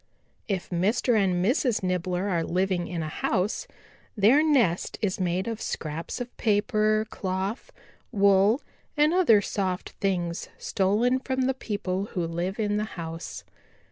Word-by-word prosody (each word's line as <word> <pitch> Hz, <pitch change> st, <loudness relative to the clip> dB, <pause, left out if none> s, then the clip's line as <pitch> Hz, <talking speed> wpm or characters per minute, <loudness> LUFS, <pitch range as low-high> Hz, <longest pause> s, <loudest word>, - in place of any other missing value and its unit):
"If 190 Hz, -4 st, -3 dB
Mr. 215 Hz, +7 st, +2 dB
and 185 Hz, -4 st, +2 dB
Mrs. 245 Hz, -2 st, +1 dB
Nibbler 180 Hz, +1 st, -1 dB
are 170 Hz, -4 st, 0 dB
living 180 Hz, +1 st, 0 dB
in 170 Hz, -3 st, -3 dB
a -, -, -3 dB
house, 185 Hz, +5 st, -1 dB, 0.5 s
their 225 Hz, +9 st, +6 dB
nest 240 Hz, -, +2 dB
is 200 Hz, -3 st, -1 dB
made 185 Hz, +1 st, 0 dB
of 225 Hz, -1 st, -4 dB
scraps 155 Hz, +7 st, -4 dB
of 245 Hz, 0 st, -6 dB
paper, 215 Hz, 0 st, +2 dB
cloth, 190 Hz, +4 st, -3 dB, 0.4 s
wool 200 Hz, +5 st, +4 dB, 0.4 s
and 300 Hz, +2 st, +4 dB
other 315 Hz, -, +5 dB
soft 190 Hz, -2 st, -2 dB
things 175 Hz, -4 st, -1 dB
stolen 220 Hz, +7 st, +1 dB
from 260 Hz, 0 st, -2 dB
the 260 Hz, +1 st, +2 dB
people 200 Hz, -6 st, -3 dB
who 175 Hz, -2 st, 0 dB
live 175 Hz, +5 st, -3 dB
in 205 Hz, -1 st, +1 dB
the 210 Hz, -, 0 dB
house. 165 Hz, 0 st, -6 dB
195 Hz, 140 wpm, -26 LUFS, 180-225 Hz, 0.5 s, their